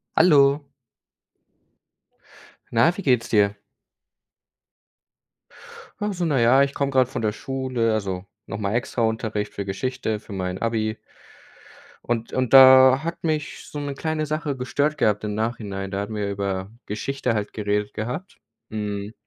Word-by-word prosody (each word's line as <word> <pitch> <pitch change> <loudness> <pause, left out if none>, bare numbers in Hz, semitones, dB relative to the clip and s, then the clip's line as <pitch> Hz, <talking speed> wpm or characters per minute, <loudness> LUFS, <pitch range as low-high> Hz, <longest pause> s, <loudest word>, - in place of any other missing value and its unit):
Hallo. 145 -3 +5 2.0
Na, 120 +9 +3
wie - - -4
geht's 125 - +1
dir? 105 -1 +3 2.4
Ach, 210 0 -1
so, 180 -2 -2
na 145 -5 +1
ja, 125 +4 +5
ich 140 0 -2
komme 140 -1 -1
gerade 130 -2 +3
von 135 - -4
der 110 -1 +1
Schule, 130 -1 -2
also, 95 -3 -3 0.2
nochmal 105 -1 -3
extra 120 0 -2
Unterricht 110 -2 -2
für 100 - -4
Geschichte, 110 +2 -3
für 105 - -11
mein 90 -1 -3
Abi. 110 -1 -1 1.1
Und 115 -1 -2
und 130 -2 0
da 130 0 +9
hat 170 +1 -5
mich 155 -2 -2
so 150 - -6
'ne 145 -1 -4
kleine 155 +1 -2
Sache 150 -1 -2
gestört 145 +4 -1
gehabt 105 -1 +1
im 105 -1 -3
Nachhinein. 105 -4 -3
Da 100 0 -2
hatten 105 +2 -5
wir 105 -1 -2
über 100 0 -3 0.2
Geschichte 125 +4 -2
halt 105 -1 -3
geredet 105 -1 -1
gehabt. 125 - -5 0.3
Mhm, 105 -1 -4
115 Hz, 145 wpm, -23 LUFS, 105-140 Hz, 2.4 s, da